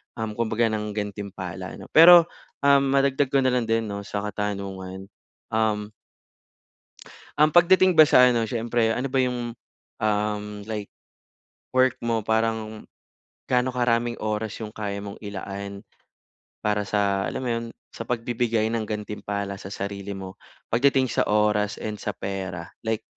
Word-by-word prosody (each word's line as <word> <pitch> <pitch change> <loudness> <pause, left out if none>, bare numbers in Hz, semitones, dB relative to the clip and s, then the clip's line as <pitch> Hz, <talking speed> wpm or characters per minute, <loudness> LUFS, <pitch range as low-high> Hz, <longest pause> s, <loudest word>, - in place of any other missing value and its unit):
um, 110 -1 -3
kumbaga 115 0 0
ng 105 -1 -3
gantimpala, 100 -3 -5
'no? - - -12
Pero, 170 +2 +9 0.4
um, 140 -1 +5
madagdag 140 0 +2
ko 135 +1 +2
na 130 - +3
lang 125 -2 0
din 115 0 +1
'no, 100 -2 -5
sa 100 0 -3
katanungan, 100 -2 -5 0.4
um 110 -1 0 1.4
Um, 150 +1 +4
pagdating 180 +2 +5
ba 155 - +11
sa 125 -2 +7
ano, 115 -2 0
siyempre 115 0 0
ano 130 +2 -1
ba 135 - +2
yung, 125 -2 -1 0.5
um, 105 0 0 0.3
like 105 -2 -4 0.9
work 130 -1 +4
mo? 115 -1 0
Parang 110 -1 -1 0.6
gaano 125 0 +1
karaming 120 -1 +1
oras 110 0 -2
yung 105 - -6
kaya 100 -2 -4
mong 100 -1 -8
ilaan 100 -1 -6 0.8
para 105 -1 0
sa 100 -1 +1
alam - - -4
mo 125 - -2
'yon? 115 0 -2 0.2
Sa 115 - -8
pagbibigay 115 -2 0
ng 115 -1 -2
gantimpala 105 -2 -4
sa - - -10
sarili 100 0 -5
mo 95 +1 -8 0.3
pagdating 130 +1 +3
sa - - +1
oras 105 0 +2
and 105 -1 -4
sa 105 - -4
pera? 95 -3 -5 0.2
Like, 110 -1 -1
110 Hz, 145 wpm, -25 LUFS, 100-120 Hz, 1.4 s, ba